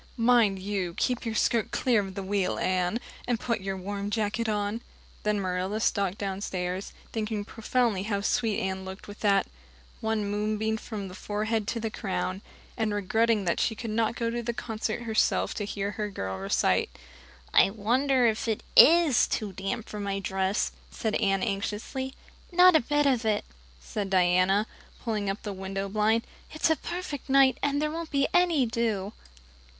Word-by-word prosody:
Mind 230 -4 +4
you 190 -3 -3
keep 250 -1 0
your 225 - -2
skirt 230 0 +2
clear 245 -4 +2
of 190 -1 -7
the 195 - -4
wheel, 195 -1 0
Anne, 185 +4 0 0.3
and 240 -2 +1
put 235 -3 -1
your 195 0 -3
warm 200 +2 -4
jacket 215 +1 -1
on." 210 +2 -1 0.4
Then 210 -1 0
Marilla 185 +2 -1
stalked 200 -3 +1
downstairs, 190 -1 -3 0.2
thinking 215 -2 -2
proudly 225 -2 0
how 200 0 -1
sweet 220 0 +1
Anne 190 0 -2
looked, 190 +1 -9
with 205 0 -10
that 200 -2 +3 0.5
"One 220 -1 -1
moonbeam 215 +2 -1
from 215 -3 -6
the 180 - -9
forehead 210 +2 -2
to 230 - -1
the 225 -1 -3
crown" 190 -2 -3 0.3
and 220 -2 0
regretting 220 +1 +2
that 170 - +1
she 225 - +1
could 225 0 -5
not 225 +1 +1
go 230 -2 -1
to 240 0 -2
the 235 0 -3
concert 225 0 -3
herself 220 -2 +1
to 205 - -3
hear 200 0 -3
her 210 0 -3
girl 95 - -4
recite. 95 +1 +1 0.6
"I - - +6
wonder 245 +5 +2
if 220 0 +1
it 220 -2 -1
is 325 -5 +7
too 210 -3 -2
damp 195 +5 -4
for 210 - -6
my 200 -1 -2
dress," 190 0 0 0.2
said 220 -1 -3
Anne 195 -1 +1
anxiously. 225 +5 -3 0.4
"Not 360 0 +7
a - - +7
bit 290 +3 +1
of 255 -4 +2
it," 215 -2 0 0.3
said 195 - -4
Diana, 185 +2 +3 0.4
pulling 215 -4 -1
up 195 - -4
the 205 - -4
window 195 +1 -4
blind. 215 +3 +1 0.3
"It's 310 +1 +1
a - - +4
perfect 345 -6 -6
night, 270 -1 +5
and 285 0 +1
there 300 0 0
won't 330 0 -5
be 275 -1 +2
any 345 -7 +4
dew. 225 -3 -1
215 Hz, 175 wpm, -28 LUFS, 195-235 Hz, 0.6 s, is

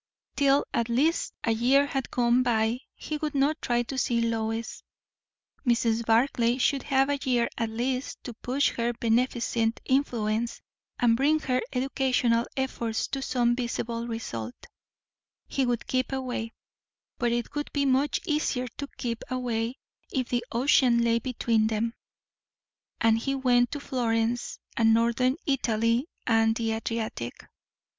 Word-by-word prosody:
Till 280 0 +3
at 235 0 0
least 290 +8 +1
a 230 - +2
year 255 +5 +4
had 270 -2 -3
gone 245 0 +3
by 230 -1 +1 0.2
he 305 - -4
would 300 -1 -3
not 290 +3 +1
try 240 0 +1
to 260 +2 -4
see 240 -2 +1
Lois; 225 -1 -2 0.8
Mrs. 235 -2 +2
Barclay 235 +1 +2
should 275 +1 +2
have 270 -1 +2
a 285 - 0
year 245 -2 +2
at 230 -1 -1
least 250 +4 -3
to 245 - -6
push 255 +5 0
her 235 0 -1
beneficent 230 -1 0
influence 235 -4 0 0.4
and 235 -2 +4
bring 295 +5 +3
her 255 -3 0
educational 250 -3 +1
efforts 235 -4 -1
to 270 - -3
some 245 -2 +1
visible 235 -1 -3
result; 120 - -5 0.9
he 270 -2 0
would 240 -2 -1
keep 255 +1 -1
away; 250 -4 -3 0.7
but 240 -1 +1
it 240 -1 -2
would 295 0 -3
be 285 -1 0
much 270 +2 +2
easier 300 -4 0
to 280 - -4
keep 230 -2 -3
away 240 -2 -2 0.4
if 255 -2 -1
the 240 -1 0
ocean 240 -1 +4
lay 230 0 +3
between 230 -3 +1
them, 225 +1 -1 1.1
and 225 0 +3
he 275 +4 -1
went 245 -2 +3
to 290 - -3
Florence 240 -3 -1 0.2
and 225 -1 +4
northern 235 +3 +2
Italy 235 -2 +1 0.2
and 225 -1 +3
the 225 -1 -1
Adriatic. 220 - -3
240 Hz, 145 wpm, -27 LUFS, 230-265 Hz, 1.1 s, year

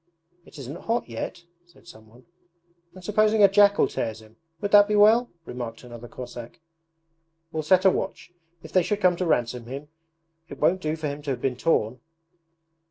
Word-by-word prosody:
'It - - -15
isn't 140 +4 -9
hot 230 +2 0
yet,' 125 +9 -6 0.2
said 175 - -23
someone. 115 -5 -16 0.7
'And 185 - -12
supposing 215 +2 +3
a - - +10
jackal 200 +1 +4
tears 110 -1 -4
him? 110 0 -18 0.2
Would 205 +2 -3
that 205 0 +7
be 210 - 0
well?' 220 +4 +5 0.2
remarked 120 -4 -7
another 120 -1 -10
Cossack. 120 -1 -10 0.9
'We'll 160 - -2
set 185 +5 +3
a 190 - +7
watch; 175 - -5 0.3
if 160 - -11
they 185 - +4
should 205 +4 -2
come 180 -3 +3
to 180 - -2
ransom 120 -4 -1
him 140 +4 -8 0.6
it - - -9
won't 185 +2 +2
do 155 -1 -2
for 160 -1 -7
him 145 +1 -5
to 145 - -6
have 125 -3 -3
been 130 -2 -1
torn.' 125 -4 0
155 Hz, 180 wpm, -25 LUFS, 120-195 Hz, 0.9 s, a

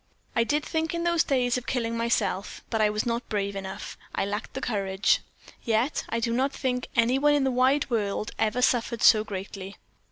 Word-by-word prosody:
I 230 - +4
did 295 +5 0
think 320 +1 -1
in 340 - -2
those 340 -1 +3
days 250 -2 +1
of 250 - -17
killing 230 -3 -1
myself, 220 -4 -1
but 225 -2 +1
I 210 - +4
was 210 0 -1
not 235 0 -2
brave 200 -1 -1
enough 190 -1 -6 0.2
I - - 0
lacked 205 +2 -4
the - - -2
courage. 195 -5 +1 0.4
Yet 230 +4 0
I 230 - -1
do 230 0 0
not 265 +3 +1
think 250 -2 -2
any 235 +3 +3
one 295 +1 +4
in 285 - +2
the 265 - +2
wide 260 +3 +3
world 210 -1 -1
ever 225 +3 +1
suffered 235 -2 +1
so 215 -1 +7
greatly. 195 -1 -7
230 Hz, 200 wpm, -27 LUFS, 210-260 Hz, 0.4 s, so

